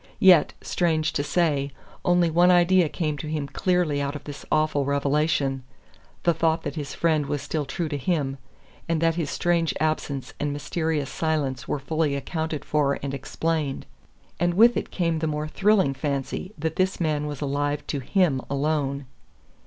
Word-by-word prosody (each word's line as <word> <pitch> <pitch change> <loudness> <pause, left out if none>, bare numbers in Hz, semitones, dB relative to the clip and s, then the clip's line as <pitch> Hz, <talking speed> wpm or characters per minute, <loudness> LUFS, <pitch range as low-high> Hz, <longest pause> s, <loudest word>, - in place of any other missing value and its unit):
Yet, 180 -5 +6
strange 160 -3 0
to 145 - 0
say, 145 -4 +1 0.3
only 175 -2 +3
one 175 +2 +5
idea 175 -1 +5
came 155 -4 -2
to 155 - -5
him 150 -2 -2
clearly 160 0 +1
out 140 +1 -2
of 145 - -7
this 145 -1 -8
awful 155 -2 +2
revelation 140 -1 +1 0.6
the 170 - +4
thought 160 0 +1
that - - -3
his 145 -4 -5
friend 155 -4 +1
was 145 -1 -2
still 150 0 -2
true 155 +5 -3
to 145 -2 -3
him 140 -2 -1 0.5
and 165 -1 +1
that 165 0 +3
his 165 -3 -2
strange 170 -2 +1
absence 155 -3 -2
and 145 0 -1
mysterious 145 -1 -2
silence 145 -6 -1
were - - -1
fully 150 +1 -1
accounted 160 +2 -3
for 145 -2 +1
and 140 -1 -3
explained. 150 +1 -2 0.5
And 175 0 +1
with 235 +4 +6
it - - -2
came 165 -3 0
the 160 - -1
more 150 0 -2
thrilling 195 -3 +3
fancy 140 +6 -3
that 160 +1 -3
this 185 0 +1
man 150 -3 0
was 145 -2 -5
alive 145 +1 -1
now - - -31
to 145 - -1
HIM 145 -1 +1
alone. 140 -1 -1
155 Hz, 175 wpm, -25 LUFS, 140-165 Hz, 0.6 s, Yet